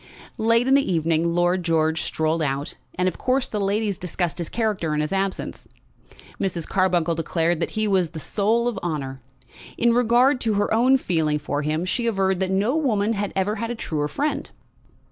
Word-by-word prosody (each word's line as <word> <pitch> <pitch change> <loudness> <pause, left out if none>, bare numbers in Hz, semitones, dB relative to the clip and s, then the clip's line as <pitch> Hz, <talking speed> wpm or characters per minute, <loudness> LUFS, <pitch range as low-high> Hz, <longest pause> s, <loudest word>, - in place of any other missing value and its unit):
Late 230 +2 +3
in 265 - +4
the 275 -7 +3
evening 165 0 +1
Lord 175 +1 +2
George 160 -2 +1
strolled 160 +1 -1
out, 140 -1 -2 0.2
and 180 +1 +1
of 185 - -2
course 260 +1 +1
the 210 - -3
ladies 200 0 0
discussed 175 -2 -2
his 170 - -2
character 210 -9 -1
in - - 0
his 150 +4 -2
absence. 195 0 -3 0.7
Mrs. 175 -4 -2
Carbuncle 175 -3 +1
declared 165 +1 0
that 170 - -1
he 215 0 +2
was 185 -4 +2
the 160 -1 -8
soul 220 +8 +1
of 240 - -2
honour. 135 -6 -4 0.6
In 235 0 +3
regard 245 +3 +3
to 220 -3 +1
her 205 +1 +1
own 255 +4 +5
feeling 160 -10 0
for 145 0 -3
him, 155 +3 -1
she 235 +5 -1
averred 190 -4 +1
that 190 -1 0
no 200 +8 +1
woman 225 -8 +1
had 205 -1 -2
ever 200 +3 0
had 230 +2 -3
a 240 - -3
truer 150 -9 -2
friend. 285 - -2
190 Hz, 190 wpm, -23 LUFS, 165-225 Hz, 0.7 s, own